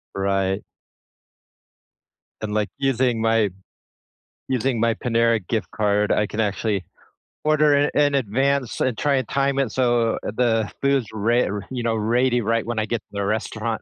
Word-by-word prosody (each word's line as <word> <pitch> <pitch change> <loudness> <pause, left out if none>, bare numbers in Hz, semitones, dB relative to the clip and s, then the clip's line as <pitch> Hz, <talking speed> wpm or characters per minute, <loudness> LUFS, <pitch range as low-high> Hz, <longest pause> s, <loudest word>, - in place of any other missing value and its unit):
Right. 95 0 0 1.8
And, 105 -1 -3
like, 105 -1 0
using 130 -4 +1
my 115 -2 +2 1.0
using 125 -2 0
my 115 0 +2
Panera 115 -1 +2
gift 110 -2 -2
card, 105 0 +1
I 105 - +2
can 110 - -4
actually 100 -1 -1 0.6
order 150 -1 +4
in 145 +1 +3
in 145 -1 +3
advance 135 +2 0
and 125 -4 0
try 145 -2 +1
and 130 - -2
time 140 0 +1
it 130 -6 0
so 120 -3 +1
the 115 -1 0
food's 140 -3 +2
re 115 +3 +2
r 100 0 -3
you 125 -2 -3
know, 115 -1 +1
ready 120 +3 +1
right 115 +1 0
when 120 -2 -2
I 110 - 0
get 115 -1 -2
to - - -70
the 100 -1 -2
restaurant. 110 +1 -2
115 Hz, 160 wpm, -22 LUFS, 110-130 Hz, 1.8 s, order